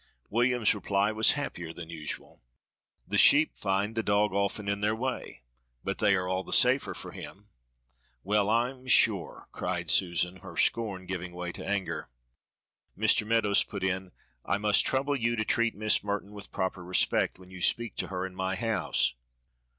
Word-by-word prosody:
William's 120 0 +3
reply 100 0 0
was 110 0 +3
happier 85 - -5
than 85 0 -9
usual. 75 -6 -7 0.7
"The 100 +1 +1
sheep 150 +2 +6
find 100 +2 -1
the 115 - 0
dog 105 -1 +1
often 100 +1 -1
in 100 0 -1
their 105 +1 +1
way, 125 - -5 0.4
but - - -3
they 100 - +4
are 90 -1 -1
all 95 +1 -1
the - - -11
safer - - +4
for - - -8
him." 105 +2 -11 0.7
"Well, 105 +1 +1
I'm 125 +3 0
sure," - - +2
cried - - -2
Susan, 90 0 +2
her 90 -3 -11
scorn 100 -5 0
giving 90 -1 -5
way 90 0 -5
to - - -8
anger. 100 -1 -3 0.9
Mr. 105 0 +3
Meadows 110 -3 +3
put 95 - -7
in: 95 -1 -2 0.3
"I 100 - 0
must 105 0 +3
trouble 135 +2 0
you 120 -2 0
to 110 -1 -1
treat 115 +1 +1
Miss 110 0 +2
Merton 100 0 -3
with 100 -2 -7
proper 95 -1 -3
respect 90 +1 +1
when 95 0 -16
you 90 -1 -9
speak 115 +3 +2
to - - -2
her 90 0 -3
in 95 - -7
my 95 +1 -2
house." 95 - 0
100 Hz, 175 wpm, -28 LUFS, 95-110 Hz, 0.9 s, sheep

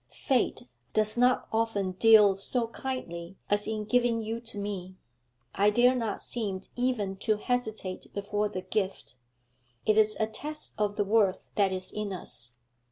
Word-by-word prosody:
'Fate 260 -3 0 0.3
does 215 0 +4
not 250 +1 +3
often 220 -4 0
deal 210 0 +6
so 230 +4 -1
kindly 195 -9 -5
as 205 0 +2
in 215 -1 -2
giving 240 +1 +2
you 225 +1 -3
to 230 -3 -8
me; 195 -2 -5 0.6
I 205 +1 +4
dare 240 +4 +5
not 230 -5 -2
seem 200 -6 -2
even 235 -6 -1
to 215 +1 +1
hesitate 220 -5 -3
before 205 +1 -1
the 185 -3 -4
gift. 190 - -3 0.7
It 215 0 +4
is 215 0 +4
a 220 - +3
test 300 +8 -5
of 205 -1 0
the 205 - 0
worth 205 -2 +2
that 200 -2 +2
is 185 0 -3
in 210 -2 -3
us. 120 -9 -5
210 Hz, 160 wpm, -29 LUFS, 195-230 Hz, 0.7 s, deal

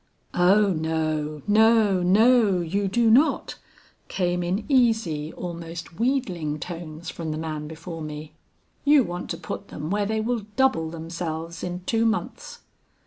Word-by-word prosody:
"'Oh 195 +3 +4
no, 155 -2 -2
no, 215 -2 +4
no, 210 +1 +4
you 195 +4 -1
do 230 +3 +3
not,' 275 +8 +3 0.5
came 180 -1 -1
in 180 +5 -2
easy, 220 - +2
almost 170 -1 -7
wheedling 185 - -1
tones 165 -1 -7
from 165 -2 -5
the 155 - -3
man 155 -1 -4
before 160 +1 -8
me. 150 0 -7 0.5
'You 290 -1 +6
want 175 -3 -5
to 170 - -3
put - - -6
them 155 +3 -6
where 205 0 0
they 220 +1 -1
will 220 -1 -2
double 260 -12 +2
themselves 165 0 -5
in 180 0 -4
two 230 +1 +2
months.' 220 0 -3
175 Hz, 140 wpm, -25 LUFS, 160-220 Hz, 0.5 s, You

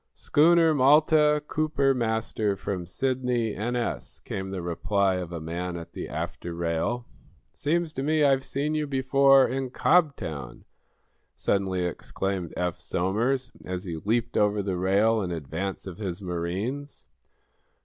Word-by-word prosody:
"Schooner 165 +1 +4
'Malta,' 150 +2 +4
Cooper, 155 -3 +1
master, 110 -3 -1
from 95 -3 -4
Sidney, 125 0 -1
N.S.," 120 +2 -3
came 95 0 -5
the 95 -2 -4
reply 95 +2 +1
of 90 -2 -5
a 85 - -4
man 85 +2 -4
at 85 - -9
the - - -6
after 85 -1 -5
rail. 85 +9 -1 0.5
"Seems 165 +2 -1
to 135 - -3
me 155 +2 +2
I've 135 -2 +3
seen 145 +3 -2
you 155 -1 -1
before, 135 0 +5
in 130 0 -2
Cobtown!" 125 - 0 0.7
suddenly 95 -2 0
exclaimed 90 +1 -3
Eph 90 -1 -1
Somers, 115 +9 -1
as 90 0 -4
he 85 -4 -5
leaped 115 +7 -1
over 105 -1 +2
the 95 -2 -2
rail 105 +4 +3
in 90 - -2
advance 85 +4 -4
of 95 -1 -8
his 95 -5 -4
marines. 95 +11 -4
105 Hz, 140 wpm, -26 LUFS, 90-135 Hz, 0.7 s, before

